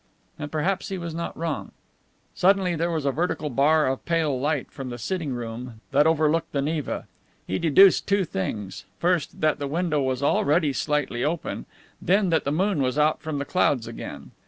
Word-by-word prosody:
And 145 -1 -5
perhaps 175 +5 -1
he 195 - -3
was 170 -2 -5
not 170 +1 -5
wrong. 165 -2 -3 0.6
Suddenly 185 -1 +3
there 165 +2 0
was 160 -4 -2
a 140 - +3
vertical 155 -1 -2
bar 150 +4 +4
of 130 0 -1
pale 160 -6 0
light 145 0 -1
from 135 -2 -6
the 120 - -6
sitting 160 - -3
room 120 -1 -6
that 145 +3 +4
overlooked 160 0 +1
the 140 - +1
Neva. 150 -2 -2 0.4
He 95 - -2
deduced 175 +4 +5
two 200 -1 +2
things: 100 - -4
first, 175 -3 0
that 155 -1 +2
the 140 - -2
window 155 0 0
was 130 0 -1
already 145 +1 +2
slightly 145 -3 -1
open, 160 +2 -3 0.3
then 190 0 +2
that 160 - +2
the 140 - 0
moon 185 0 +1
was 130 +1 0
out 150 +1 +2
from 155 -2 -3
the 140 - -2
clouds 140 -8 +1
again. 115 - -8
150 Hz, 185 wpm, -25 LUFS, 135-170 Hz, 0.6 s, deduced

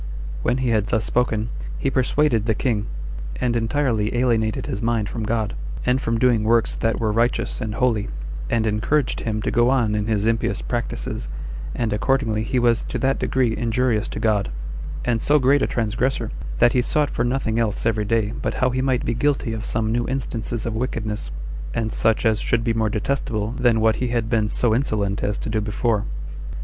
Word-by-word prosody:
When 120 +2 +1
he 130 -2 0
had 110 -2 +2
thus 110 +1 +1
spoken, 115 -2 0 0.3
he 135 - 0
persuaded 130 -3 +2
the 110 - +2
king, 110 -5 0 0.5
and 120 - 0
entirely 115 -2 +1
alienated 115 -3 +1
his 100 - -3
mind 115 -2 +1
from 115 +1 -4
God, 110 -1 0 0.3
and 125 +1 +2
from 115 0 0
doing 120 -2 +3
works 115 +1 +3
that 115 0 0
were 110 -2 +1
righteous 115 +3 0
and 110 -1 -3
holy, 115 -5 +1 0.4
and 115 -1 +1
encouraged 110 +6 +1
him 110 -1 -2
to - - 0
go 120 +1 +4
on 120 -5 +2
in 105 0 0
his 105 -2 +1
impious 115 0 0
practices 120 - -3 0.5
25 - - -4
and 110 -2 0
accordingly 115 -1 +1
he 115 +3 -1
was 120 -1 +3
to - - -4
that 135 +2 +1
degree 125 -4 +1
injurious 115 -1 +1
to - - -5
God, 105 - +1 0.6
and 115 -2 +1
so 150 - +4
great 140 +1 +4
a - - +2
transgressor, 120 +3 -1 0.3
that 120 - +5
he 125 - +3
sought 145 +3 +1
for 120 - 0
nothing 120 -2 0
else 110 -3 0
every 110 -2 +1
day 110 0 +1
but - - -1
how 130 0 +2
he 130 +1 0
might 130 -2 +1
be - - +1
guilty 130 -2 0
of 110 -1 -4
some 110 -1 0
new 120 +1 0
instances 120 -3 -2
of 115 - -2
wickedness, 110 -2 -2 0.5
and 110 -1 -1
such 115 +1 +2
as 110 -1 +3
should 115 -1 +1
be 115 -1 +1
more 110 -1 +1
detestable 110 -1 -1
than 120 -2 +2
what 110 0 +3
he 125 - -1
had 115 -1 -1
been 110 -3 +2
so 120 0 +2
insolent 105 -5 0
as 105 - 0
to - - -5
do 110 0 0
before. 105 0 0
115 Hz, 200 wpm, -22 LUFS, 110-125 Hz, 0.6 s, that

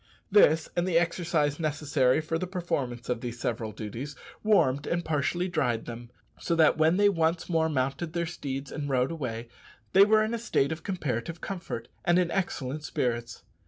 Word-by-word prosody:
This, 160 -6 +5
and 175 +1 +1
the 170 -3 +3
exercise 165 -3 +1
necessary 145 -3 +1
for 165 +1 -2
the 185 - -3
performance 145 -10 -3
of 125 -2 -1
these 120 -1 -5
several 115 -2 -2
duties, 115 +8 -6 0.3
warmed 145 -10 +3
and 170 0 -1
partially 160 +4 0
dried 135 -10 0
them; 120 0 -8 0.3
so 170 - 0
that 160 -2 +5
when 160 +3 +3
they 205 0 +5
once 165 -3 +1
more 160 -2 +2
mounted 135 +4 -1
their 170 0 0
steeds 140 -4 -5
and 145 -1 -4
rode 130 +1 +1
away, 120 -7 -4 0.5
they 195 - +8
were 215 +1 +5
in 220 +2 -2
a 235 - -1
state 160 -11 +1
of 160 - -4
comparative 160 - -3
comfort 170 -11 -5 0.2
and 175 0 +3
in 180 -2 +2
excellent 150 -6 -2
spirits. 120 -5 -2
155 Hz, 180 wpm, -28 LUFS, 130-175 Hz, 0.5 s, they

